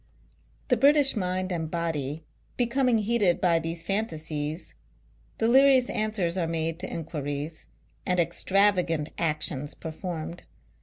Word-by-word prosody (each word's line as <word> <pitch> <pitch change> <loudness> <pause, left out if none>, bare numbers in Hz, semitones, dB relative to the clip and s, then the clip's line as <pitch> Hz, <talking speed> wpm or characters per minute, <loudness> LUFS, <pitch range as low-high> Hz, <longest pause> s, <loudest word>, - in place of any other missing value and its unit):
The 250 - +4
British 280 +2 +5
mind 185 -1 -2
and 165 -3 -2
body 160 -3 -3 0.3
becoming 245 0 +2
heated 210 -4 +2
by 170 -3 +3
these 165 0 -3
fantasies, 160 -5 -2 0.6
delirious 260 +2 +5
answers 200 -5 -1
are 170 - 0
made 165 0 -2
to 185 - -5
inquiries, 150 -1 -5 0.4
and 180 -1 0
extravagant 180 -3 +2
actions 150 -3 -2
performed. 165 0 -6
175 Hz, 110 wpm, -27 LUFS, 160-215 Hz, 0.6 s, British